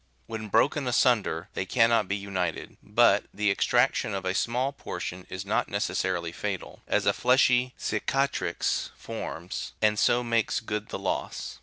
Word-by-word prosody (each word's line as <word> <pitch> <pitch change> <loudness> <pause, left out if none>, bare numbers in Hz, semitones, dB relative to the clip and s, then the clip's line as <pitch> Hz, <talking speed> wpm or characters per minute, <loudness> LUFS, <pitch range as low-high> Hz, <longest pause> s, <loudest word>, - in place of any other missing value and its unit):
"When 110 -1 -6
broken 130 +6 +2
asunder 115 -9 +2
they 95 - -3
can 115 +2 +4
not 110 -4 +3
be 100 - 0
united, 100 -2 -3
but - - +4
the 105 0 +1
extraction 120 0 +2
of 95 -1 -4
a 95 - 0
small 125 +6 0
portion 90 -9 -6
is 95 +1 -5
not 105 +3 0
ne - - -1
cessarily 85 -1 -1
fatal, - - -5
as - - +1
a - - +4
fleshy 125 0 +3
cicatrix 135 +1 -1
forms, 85 +2 -6
and 105 -1 +2
so 120 +1 +3
makes 115 -2 +1
good 105 -1 -4
the - - -4
loss. - - -4
110 Hz, 160 wpm, -27 LUFS, 95-125 Hz, -, can